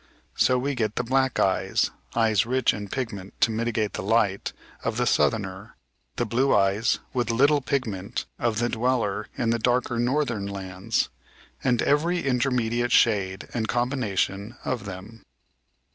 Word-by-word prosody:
So 125 - +3
we 140 +3 -1
get 110 -4 -1
the - - 0
black 130 +1 +1
eyes 95 0 +1 0.2
(eyes 110 -2 +3
rich 125 +1 +2
in 105 0 -5
pigment, 100 -5 -5
to 115 - +4
mitigate 110 -1 -1
the - - -3
light) 100 -1 +1 0.3
of 115 0 -1
the 125 - +1
southerner, 100 -4 0 0.4
the 120 - 0
blue 125 +5 +2
eyes 100 +3 +2 0.2
(with 120 -3 0
little 140 +5 +4
pigment) 110 -9 -2
of 115 -2 0
the 120 +1 +1
dweller 115 -4 0
in 115 -1 +1
the 115 - +1
darker 120 0 +1
northern 120 -5 0
lands, 95 +2 -2 0.5
and 125 -3 +2
every 170 +4 +1
intermediate 120 -2 +1
shade 95 -4 +2
and 110 -2 -1
combination 120 -4 -1
of 120 -5 -2
them. 100 +3 -9
115 Hz, 145 wpm, -25 LUFS, 100-125 Hz, 0.5 s, to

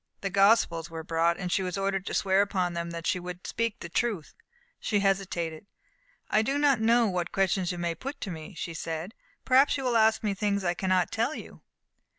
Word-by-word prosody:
The 195 - -2
Gospels 195 -4 +3
were 165 -1 -6
brought, 165 +1 +1
and 180 -2 -4
she 195 - +2
was 185 0 -3
ordered 195 -1 -1
to - - -2
swear 190 0 +3
upon 185 -3 0
them 170 0 -3
that 170 -1 -6
she 180 - +1
would 180 0 -8
speak 230 -2 -2
the - - -5
truth. 195 -2 -2 0.5
She 205 -2 0
hesitated. 190 -4 -1 0.6
"I 215 - +3
do 270 +6 0
not 285 -5 +3
know 230 +1 +4
what 180 -4 -1
questions 190 -2 +1
you 175 - -5
may 170 -1 -1
put 275 - -7
to 195 - -4
me," 160 +3 -8
she 170 - -5
said. 165 +4 -5 0.3
"Perhaps 270 +3 +4
you 270 - -4
will 245 -2 +2
ask 220 0 +3
me 210 -2 +1
things 200 0 -1
I 175 -1 +1
cannot 185 0 +1
tell 230 +7 0
you." - - -10
195 Hz, 210 wpm, -28 LUFS, 170-220 Hz, 0.6 s, know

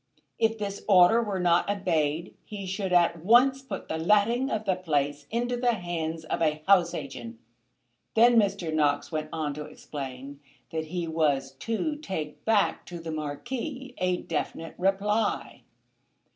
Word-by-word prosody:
If 225 0 +2
this 200 -2 -4
order 195 +3 +6
were 205 -4 -2
not 175 +1 +3
obeyed 170 -5 0
he 205 -2 -7
should 190 0 -3
at 170 -2 +3
once 255 +6 +5
put 265 - -7
the 160 - -3
letting 210 +9 +3
of 220 -3 -2
the 190 -2 +2
place 145 -5 -1
into 240 +2 -1
the 245 0 +2
hands 165 -4 -4
of 155 - -2
a 155 -1 +1
house 180 -3 +5
agent. 120 -5 -7 0.8
Then 235 +2 +6
Mr. 200 -7 +2
Knox 150 0 +1
went 155 -1 -3
on 155 -3 -2
to 150 +1 -6
explain 140 -2 -8 0.3
that 160 -1 -2
he 170 +1 -3
was 155 -4 +1
to 290 +7 -2
take 185 - -5
back 220 -2 +2
to 175 - -7
the 165 -1 -6
Marquis 245 - -5
a 180 0 +1
definite 165 0 -4
reply. 205 +3 0
180 Hz, 155 wpm, -27 LUFS, 155-215 Hz, 0.8 s, order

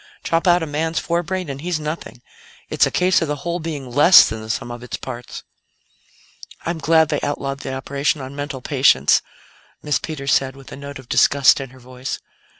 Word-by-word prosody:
Chop 165 +3 0
out 175 -1 +4
a - - -1
man's 160 +2 -2
forebrain 175 +1 -2
and 140 -1 -6
he's 175 -1 -2
nothing. 150 -5 -6 0.5
It's - - +3
a - - -1
case 180 0 +2
of 165 - 0
the 150 - -1
whole 170 +1 -1
being 155 -4 -5
less 150 +8 +8
than 110 0 -5
the 110 - -10
sum 120 +1 -3
of 120 0 -8
its 125 - -6
parts." 125 -2 -8 1.2
"I'm 170 -1 -2
glad 160 +1 +3
they 150 - -1
outlawed 140 -1 -3
the 130 -1 -5
operation 140 +3 -1
on 135 +1 -8
mental 145 -2 -5
patients," 130 - +4 0.6
Miss 150 -1 0
Peters 140 -4 -2
said, 135 0 +1
with 135 -1 -14
a - - -7
note 140 0 -8
of 130 -2 -13
disgust 140 +1 +4
in 135 - -7
her 130 +1 -17
voice. 130 +1 -6
140 Hz, 200 wpm, -20 LUFS, 130-160 Hz, 1.2 s, less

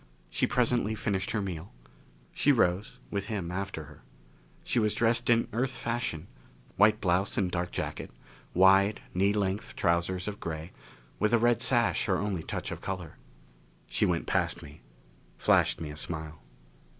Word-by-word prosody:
She - - +1
presently 120 -3 +1
finished 100 -3 -1
her 105 -3 -1
meal. 90 -1 -5 0.6
She 145 - +3
rose, 100 -5 +1
with 100 -1 -2
him 100 -6 -3
after 95 -3 -4
her. 75 0 -14 0.6
She 125 - +1
was 105 -2 +1
dressed 115 +1 +2
in 115 -1 +4
Earth 130 +3 -1
fashion 115 -9 -2 0.5
white 105 +2 +5
blouse 95 +2 +1
and 90 -3 +1
dark 90 0 -1
jacket, - - -4 0.5
wide, 95 +3 +5
knee 95 +3 +3
length 100 -1 -2
trousers 90 +1 0
of 105 -1 -4
gray, 80 +1 -5 0.5
with 105 +3 +2
a - - +5
red 120 0 +3
sash - - +2
her - - +2
only 100 -4 -2
touch - - -4
of - - -6
color. 95 -5 -5 0.7
She - - +1
went 85 -2 0
past - - 0
me, 75 +2 -13 0.6
flashed - - +3
me 80 -2 -5
a 75 - -9
smile. 80 -1 -6
95 Hz, 160 wpm, -29 LUFS, 85-110 Hz, 0.7 s, white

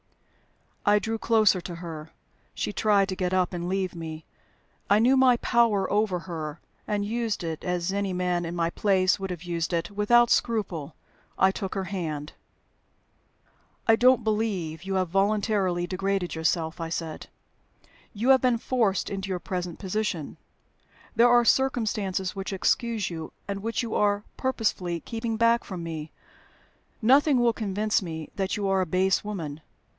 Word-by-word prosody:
I 205 0 +5
drew 225 +2 -2
closer 215 -5 +3
to 175 0 -7
her. 165 -2 -8 0.5
She 205 - -2
tried 205 -2 +3
to 185 - -2
get 180 0 -1
up 185 0 +1
and 175 0 -3
leave 190 -1 -1
me. 160 -2 -7 0.6
I 205 - +6
knew 245 +5 +4
my 260 -2 +5
power 230 -6 +2
over 205 -3 +1
her, 160 -3 -6 0.3
and 205 -1 -1
used 225 -2 -2
it 160 -2 -4
(as 180 0 -1
any 200 -1 -1
man 180 -1 0
in 170 +1 -4
my 170 -1 0
place 190 -1 +2
would 195 0 -4
have 175 -2 -6
used 170 -1 -2
it) 170 +3 -1
without 235 +4 +4
scruple. 185 - 0 0.4
I 190 0 +4
took 190 0 -5
her 195 - -1
hand. 160 -6 -4 1.5
"I 225 - +7
don't 250 +1 +4
believe 200 -7 -1
you 195 0 -3
have 185 -2 0
voluntarily 195 -2 +1
degraded 195 0 -1
yourself," 160 0 -1
I 165 - -3
said. 165 -2 -5 0.8
"You 225 +5 -1
have 265 -1 +7
been 250 -2 +3
forced 225 -5 0
into 195 -1 -4
your 185 -1 -2
present 180 -2 -4
position: 190 -5 -3 0.8
there 235 +1 +6
are 240 0 +5
circumstances 215 -8 +1
which 195 0 -4
excuse 210 +1 0
you, 160 -2 -7
and 200 -1 -4
which 230 +3 -2
you 230 - -4
are 205 0 +2
purposely 210 -9 -1
keeping 225 -1 -3
back 230 +1 +3
from 180 -4 -6
me. 160 -2 -6 0.9
Nothing 275 +3 +5
will 240 -1 +3
convince 210 0 0
me 160 -4 -6
that 195 0 -1
you 200 -1 -1
are 195 -1 +2
a 185 - -1
base 185 +2 +2
woman. 165 -8 -5
195 Hz, 160 wpm, -26 LUFS, 175-220 Hz, 1.5 s, I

